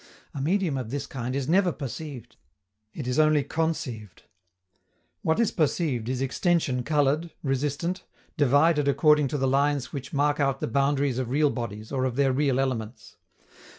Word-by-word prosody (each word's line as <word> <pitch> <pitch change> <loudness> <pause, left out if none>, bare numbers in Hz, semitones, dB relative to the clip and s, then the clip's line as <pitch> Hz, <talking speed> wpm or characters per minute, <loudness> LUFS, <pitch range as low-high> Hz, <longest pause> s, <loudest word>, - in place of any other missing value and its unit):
A 140 - -4
medium 170 -1 0
of 120 -4 -5
this 140 +3 -3
kind 125 0 -4
is 135 -2 -2
never 180 +2 +3
perceived; 140 -2 -7 0.6
it 140 +2 -6
is 125 +3 0
only 155 -2 +4
conceived. 135 - -3 1.0
What 160 +6 +1
is 235 - +2
perceived 145 -7 0
is 130 0 -1
extension 135 -2 +1
colored, 150 +4 +1
resistant, 145 +6 -2 0.3
divided 145 +2 +3
according 150 0 +4
to 145 - -2
the 135 -1 0
lines 140 0 +1
which 140 -1 -6
mark 145 +1 +1
out 135 -1 +1
the - - -2
boundaries 140 +1 +1
of 125 -2 -3
real 145 +2 +2
bodies 110 -3 -6
or 130 -2 0
of 125 -2 -2
their 135 -1 +2
real 135 -1 +1
elements. 125 -4 -4
140 Hz, 160 wpm, -26 LUFS, 130-150 Hz, 1.0 s, only